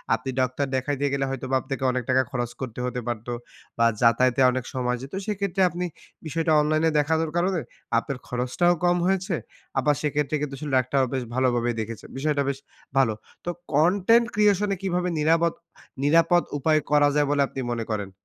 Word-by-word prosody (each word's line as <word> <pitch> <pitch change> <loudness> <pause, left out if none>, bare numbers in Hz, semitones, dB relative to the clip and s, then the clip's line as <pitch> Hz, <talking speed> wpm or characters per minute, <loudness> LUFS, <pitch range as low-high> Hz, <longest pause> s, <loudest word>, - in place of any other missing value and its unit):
আপনি 125 +4 -6
ডাক্তার 130 +2 0
দেখাইতে 140 +2 -1
গেলে 135 -1 0
হয়তোবা 135 0 -2
আপনাকে 135 -1 -5
অনেক 130 0 -2
টাকা 130 0 +4
খরচ 120 -2 -2
করতে 125 -2 -5
হতে 125 0 -3
পারতো 120 0 -3 0.5
বা, 115 - +4 0.2
যাতায়াতে 125 +2 +4
অনেক 130 -1 -3
সময় 125 -1 -1
যেত। 135 +2 -9
সেক্ষেত্রে 200 -2 -1
আপনি 175 +1 -3 0.4
বিষয়টা 160 +1 -1
অনলাইনে 155 +2 +2
দেখানোর 160 +2 +1
কারণে 180 +1 +1 0.4
আপনার 130 +3 -2
খরচটাও 125 +8 +1
কম 175 0 +3
হয়েছে, 190 -1 0 0.4
আবার 150 0 +2
সেক্ষেত্রে 150 0 0
কিন্তু 145 -2 -3
আসলে 145 0 -5
ডাক্তারও 130 +1 +1
বেশ 130 -1 -1
ভালোভাবে 120 -2 +1
দেখেছেন। 110 0 -7
বিষয়টা 145 0 +1
বেশ 140 - -2 0.4
ভালো। 130 -5 +4 0.3
তো - - -2 0.3
কন্টেন্ট 195 +9 +4
creation 210 -1 +3
এ - - -12
কীভাবে 180 -1 0
নিরাবদ 165 +2 +3 0.5
নিরাপদ 165 +4 +4
উপায় 155 +2 +3
করা 145 -1 +5
যায় 145 -1 +3
বলে 145 -1 +2
আপনি 135 - -7
মনে 115 -1 -2
করেন? 100 -2 -3
145 Hz, 170 wpm, -25 LUFS, 130-165 Hz, 0.5 s, করা